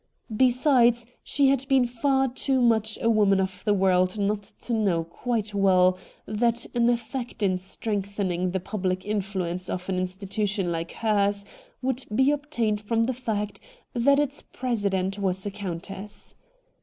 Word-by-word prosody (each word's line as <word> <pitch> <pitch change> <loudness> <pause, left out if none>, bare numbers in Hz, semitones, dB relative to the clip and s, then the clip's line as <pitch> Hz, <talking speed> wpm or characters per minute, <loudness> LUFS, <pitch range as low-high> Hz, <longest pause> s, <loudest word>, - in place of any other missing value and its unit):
Besides, 245 -1 +4 0.2
she 280 -2 +2
had 270 -1 +1
been 265 -2 +4
far 265 +3 +1
too 265 +1 0
much 220 -3 +2
a - - +3
woman 205 -4 +4
of 190 -1 -2
the 210 - +4
world 185 0 +2
not 205 0 0
to 220 +4 -6
know 195 -7 +1
quite 215 +5 -3
well 185 -2 +4 0.3
what 235 +2 0
an 235 0 +3
effect 240 0 -3
in 185 -2 +2
strengthening 195 -2 -2
the 190 +1 -1
public 185 -1 -2
influence 190 -3 -2
of 180 0 -4
an 185 -1 0
institution 195 +1 -1
like 165 0 -3
hers 205 -2 +1 0.4
would 260 0 0
be 265 +3 +4
obtained 240 -8 -1
from 225 +2 +1
the 255 +3 0
fact 210 -5 -3 0.3
that 280 +4 +4
its 290 0 -1
presi 235 -6 -2
dent 190 +1 -1
was 190 -1 -1
a 205 - -2
countess. 195 +1 -7
210 Hz, 155 wpm, -26 LUFS, 190-240 Hz, 0.4 s, Besides